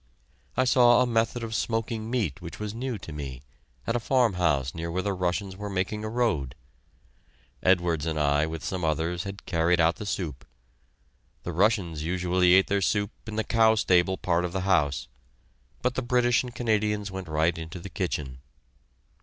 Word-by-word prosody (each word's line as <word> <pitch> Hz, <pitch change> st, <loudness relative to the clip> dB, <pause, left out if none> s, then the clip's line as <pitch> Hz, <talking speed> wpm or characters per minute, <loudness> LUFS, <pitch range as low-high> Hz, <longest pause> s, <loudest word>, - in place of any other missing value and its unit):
I 130 Hz, -, +4 dB
saw 120 Hz, 0 st, +6 dB
a -, -, +1 dB
method 115 Hz, 0 st, 0 dB
of 115 Hz, -1 st, -4 dB
smoking 115 Hz, 0 st, -2 dB
meat 105 Hz, -, -1 dB
which 85 Hz, -1 st, -8 dB
was 105 Hz, -1 st, -4 dB
new 125 Hz, 0 st, -3 dB
to 80 Hz, -5 st, -9 dB
me, 70 Hz, -4 st, -6 dB, 0.4 s
at 115 Hz, -, -1 dB
a -, -, +2 dB
farmhouse 90 Hz, -, +1 dB
near 85 Hz, 0 st, -4 dB
where 90 Hz, +2 st, -2 dB
the 100 Hz, -, 0 dB
Russians 95 Hz, +1 st, -2 dB
were 105 Hz, +1 st, -6 dB
making 100 Hz, +3 st, -2 dB
a 110 Hz, -, -3 dB
road. 110 Hz, -, 0 dB, 1.1 s
Edwards 85 Hz, -4 st, +2 dB
and 80 Hz, -1 st, -1 dB
I, 75 Hz, +1 st, +2 dB
with 80 Hz, 0 st, -6 dB
some 90 Hz, -2 st, -3 dB
others, 80 Hz, +3 st, -1 dB
had 100 Hz, 0 st, -7 dB
carried 85 Hz, -1 st, +2 dB
out 85 Hz, 0 st, +3 dB
the 105 Hz, -, -6 dB
soup. 75 Hz, -10 st, -3 dB, 1.0 s
The 85 Hz, -, -4 dB
Russians 90 Hz, -4 st, +1 dB
usually 90 Hz, +2 st, +3 dB
ate 95 Hz, -, +5 dB
their 100 Hz, 0 st, 0 dB
soup 105 Hz, +1 st, +1 dB, 0.2 s
in 110 Hz, -, -5 dB
the 110 Hz, -, 0 dB
cow 110 Hz, -1 st, +4 dB
stable 95 Hz, -2 st, +3 dB
part 85 Hz, -1 st, 0 dB
of 90 Hz, -1 st, -3 dB
the 95 Hz, -, -1 dB
house, 85 Hz, -7 st, +1 dB, 0.8 s
but 125 Hz, 0 st, +1 dB
the 130 Hz, -, -2 dB
British 120 Hz, -1 st, +2 dB
and 125 Hz, -1 st, -8 dB
Canadians 105 Hz, -3 st, 0 dB
went 95 Hz, -1 st, -6 dB
right 80 Hz, +2 st, +1 dB
into 80 Hz, +2 st, -7 dB
the 85 Hz, -, -8 dB
kitchen. 75 Hz, -9 st, -3 dB
95 Hz, 180 wpm, -27 LUFS, 85-110 Hz, 1.1 s, saw